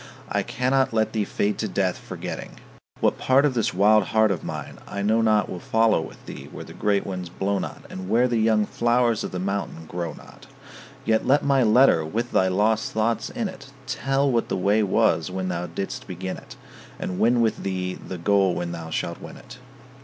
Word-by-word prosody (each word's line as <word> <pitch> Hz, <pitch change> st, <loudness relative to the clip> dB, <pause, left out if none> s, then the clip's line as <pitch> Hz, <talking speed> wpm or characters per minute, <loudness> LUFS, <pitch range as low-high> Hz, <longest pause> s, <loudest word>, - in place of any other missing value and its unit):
I -, -, +1 dB
cannot 130 Hz, 0 st, 0 dB
let 110 Hz, -1 st, +1 dB
thee 110 Hz, -2 st, 0 dB
fade 105 Hz, +1 st, -1 dB
to 110 Hz, -, -1 dB
death, 95 Hz, -2 st, 0 dB
forgetting. -, -, -7 dB, 0.4 s
What -, -, +2 dB
part 135 Hz, +2 st, +4 dB
of 145 Hz, -, +2 dB
this 115 Hz, -3 st, +1 dB
wild 105 Hz, +2 st, +4 dB
heart 110 Hz, 0 st, +3 dB
of 90 Hz, -, -3 dB
mine -, -, -6 dB
I 100 Hz, -, -4 dB
know 110 Hz, +2 st, +3 dB
not 110 Hz, -2 st, +3 dB
Will 90 Hz, -, -6 dB
follow 110 Hz, -1 st, +2 dB
with -, -, -10 dB
thee -, -, -9 dB
where -, -, -8 dB
the -, -, -11 dB
great 100 Hz, -1 st, 0 dB
winds 90 Hz, -2 st, -5 dB
blow 95 Hz, +3 st, -1 dB
not, -, -, -6 dB
And 95 Hz, 0 st, -7 dB
where 120 Hz, +4 st, +4 dB
the 120 Hz, -2 st, 0 dB
young 110 Hz, -1 st, +3 dB
flowers 120 Hz, 0 st, +1 dB
of -, -, -3 dB
the 90 Hz, -, -5 dB
mountain 95 Hz, -3 st, -3 dB
grow 85 Hz, 0 st, -4 dB
not. -, -, -15 dB, 0.6 s
Yet 110 Hz, 0 st, +1 dB
let 140 Hz, +2 st, +4 dB
my 140 Hz, -2 st, +4 dB
letter 115 Hz, -6 st, +5 dB
with 115 Hz, +10 st, -3 dB
thy 95 Hz, -, +3 dB
lost 105 Hz, +4 st, +1 dB
thoughts 115 Hz, +2 st, 0 dB
in 235 Hz, -4 st, -2 dB
it 180 Hz, -8 st, -10 dB, 0.2 s
Tell 135 Hz, +1 st, 0 dB
what 115 Hz, -2 st, 0 dB
the -, -, 0 dB
way 100 Hz, +4 st, +3 dB
was 95 Hz, -4 st, +2 dB
when 95 Hz, 0 st, -3 dB
thou 90 Hz, 0 st, -2 dB
didst 85 Hz, +4 st, -5 dB
begin 95 Hz, 0 st, -5 dB
it, -, -, -12 dB, 0.4 s
And 90 Hz, -, -4 dB
win 120 Hz, +2 st, +4 dB
with 115 Hz, -2 st, +1 dB
thee 95 Hz, -1 st, -2 dB
the 95 Hz, -, -8 dB
goal 95 Hz, +1 st, +2 dB
when 85 Hz, -1 st, -3 dB
thou 85 Hz, -1 st, -6 dB
shalt -, -, -3 dB
win -, -, -9 dB
it. 125 Hz, +1 st, -13 dB
105 Hz, 210 wpm, -24 LUFS, 95-115 Hz, 0.6 s, letter